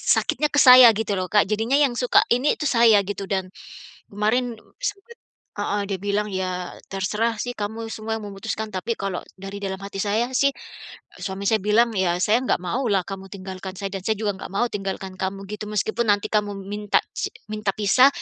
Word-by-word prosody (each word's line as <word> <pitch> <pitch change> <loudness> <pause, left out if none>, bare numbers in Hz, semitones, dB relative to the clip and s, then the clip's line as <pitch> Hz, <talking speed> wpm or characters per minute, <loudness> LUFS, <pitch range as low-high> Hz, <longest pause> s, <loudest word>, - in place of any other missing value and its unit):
sakitnya 300 - 0
ke 290 - +4
saya 250 -2 +10
gitu 215 -1 -1
loh 185 - -1
Kak. 210 - +6
Jadinya 225 +5 +1
yang 275 -4 +3
suka 250 0 +4
ini 255 +5 +2
itu 300 - -3
saya 230 -3 +6
gitu 200 0 -4
dan 190 -2 -1 0.7
kemarin 230 +4 0 0.2
sempat 470 -2 -5 0.4
heeh, 205 0 -1
dia 195 - -1
bilang, 205 +2 -1
"Ya, 185 -1 -3
terserah 210 +4 0
sih 245 - -2
kamu 220 +2 -4
semua 220 0 -4
yang - - -10
memutuskan, 220 +2 -4
tapi 200 +4 -2
kalo 195 -4 -4 0.2
dari 195 +1 -7
dalam 190 0 -4
hati 200 0 -7
saya 215 +4 0
sih," 280 +1 +3 0.7
suami 195 0 -4
saya 220 -1 +3
bilang, 225 +3 +3
"ya 185 -3 +1
saya 220 +3 +3
enggak 260 - +1
mau 235 +10 -1
lah 195 -2 +3
kamu 195 -1 -7
tinggalkan 190 -1 -7
saya 195 -1 -4
dan 195 - -4
saya 220 +1 +1
juga 210 -2 0
enggak - - -8
mau 240 - +2
tinggalkan 195 -1 -4
kamu 195 +1 -3
gitu, 210 0 -5
meskipun 220 +2 -1
nanti 205 0 0
kamu 210 -1 +1 0.2
minta 210 -1 +2 0.2
si - - -2 0.2
minta 210 -2 -1
pisah, 215 +6 +5
210 Hz, 195 wpm, -23 LUFS, 195-230 Hz, 0.7 s, saya